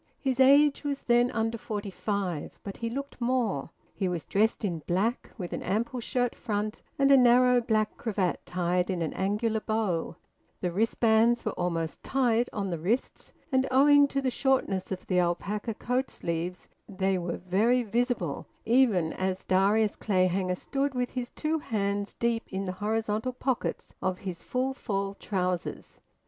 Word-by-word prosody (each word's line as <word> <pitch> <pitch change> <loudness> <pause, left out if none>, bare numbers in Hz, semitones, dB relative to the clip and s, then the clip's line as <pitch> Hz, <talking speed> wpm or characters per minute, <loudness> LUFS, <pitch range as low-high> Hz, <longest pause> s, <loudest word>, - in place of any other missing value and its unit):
His 265 -2 -1
age 280 +3 +6
was 285 -1 -3
then 240 0 +4
under 225 -1 -1
forty 205 -2 -4
five, 190 -6 -3
but 200 - -7
he 230 - -3
looked 275 +1 -6
more. 235 - 0 0.2
He 195 - -1
was 175 -4 -3
dressed 220 +2 +1
in 170 -5 -2
black, 205 +8 0
with 180 -5 -5
an - - -3
ample 235 +6 -1
shirt 245 +1 -1
front 210 -1 -3 0.2
and 275 0 +4
a - - +9
narrow 250 0 +5
black 215 -2 0
cravat 200 -6 -1
tied 180 +1 0
in 180 -3 -1
an 160 - -3
angular 210 +3 0
bow; 210 -7 -1 0.4
the 180 - -1
wristbands 225 +3 +3
were - - 0
almost 165 -3 -2
tight 245 -3 +1
on 200 -3 -3
the 170 - -2
wrists, 215 +10 -2 0.2
and, 260 0 +2
owing 285 +2 +6
to 275 0 -2
the 260 - +1
shortness 245 -9 0
of 185 - -4
the 180 -1 +2
alpaca 200 +5 -1
coat 250 +4 -1
sleeves, 170 +2 -4 0.2
they 190 -1 0
were 170 -1 -3
very 215 +8 +2
visible 230 - -1 0.2
even 225 -9 +3
as 185 0 -2
Darius 200 +3 +3
Clayhanger 185 -2 +1
stood, 275 +4 -2
with 250 0 -1
his 245 -1 -4
two 315 +1 -1
hands 200 -5 -2
deep 235 -1 -1
in 195 +1 -2
the 185 - -2
horizontal 220 +3 -1
pockets 255 0 -2
of 185 -1 0
his 180 -3 -4
`full 260 +1 -1
fall' 195 -5 -2
trousers. 185 -3 -3
215 Hz, 165 wpm, -28 LUFS, 185-245 Hz, 0.4 s, a